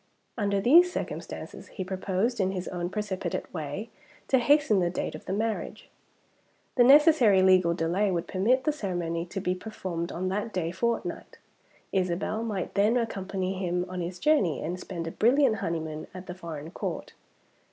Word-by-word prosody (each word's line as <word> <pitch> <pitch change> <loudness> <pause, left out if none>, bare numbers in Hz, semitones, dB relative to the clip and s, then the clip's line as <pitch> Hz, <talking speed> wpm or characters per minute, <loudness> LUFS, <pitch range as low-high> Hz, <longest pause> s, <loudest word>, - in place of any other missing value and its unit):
Under 200 -3 0
these 340 - +6
circumstances, - - -6
he 190 - -5
proposed, 190 +5 -1
in 190 -1 +1
his 185 -1 -4
own 175 -1 -3
precipitate 205 -2 -3
way, 160 +7 -5 0.4
to 265 - +5
hasten 280 -5 +4
the 175 -1 +1
date 175 - -3
of - - -9
the - - -4
marriage. 220 +2 -3 0.8
The 245 - +5
necessary 265 - +6
legal 185 -2 +5
delay 175 +5 +1
would 170 -3 -1
permit 235 +8 +2
the 305 - +2
ceremony 175 - -3
to 195 - -4
be 180 -1 0
performed 180 -4 -5
on 185 +2 -2
that 205 +4 -2
day 170 -4 -2
fortnight. 235 +6 -3 0.5
Isabel 185 +3 -1
might 210 -5 -3
then 210 +4 +3
accompany 195 -4 -2
him 180 -1 -1
on 180 0 -4
his 175 +1 -4
journey, 195 - +2
and 175 +3 -3
spend 175 -3 -5
a 165 - -4
brilliant 245 - +3
honeymoon 160 -4 -3
at 185 0 -8
the 180 - -6
foreign 165 -3 -7
Court. - - -5
190 Hz, 165 wpm, -28 LUFS, 175-220 Hz, 0.8 s, these